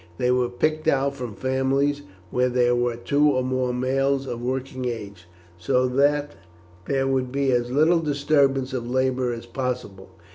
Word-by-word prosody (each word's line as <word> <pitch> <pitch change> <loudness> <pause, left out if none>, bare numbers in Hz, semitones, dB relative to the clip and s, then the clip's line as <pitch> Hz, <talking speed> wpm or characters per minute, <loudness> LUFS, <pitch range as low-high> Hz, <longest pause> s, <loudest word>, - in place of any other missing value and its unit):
They 125 0 +1
were 125 -1 +1
picked 155 +6 -1
out 140 +1 +2
from 125 -6 -7
families 135 +2 0 0.3
where 125 0 +2
there 120 0 +2
were 120 -1 0
two 145 +5 +2
or 130 -3 +1
more 130 -1 -1
males 135 +2 0
of 120 -2 -5
working 130 +1 -3
age, 100 -7 -6 0.3
so 125 +8 +1
that 145 +3 +2 0.6
there 135 -1 +1
would 130 -2 0
be 140 0 +1
as 120 -1 +1
little 160 +5 +4
disturbance 140 -3 +1
of 120 -2 -3
labour 130 -1 0
as 115 0 -6
possible. 120 -6 -5
130 Hz, 160 wpm, -24 LUFS, 125-140 Hz, 0.6 s, little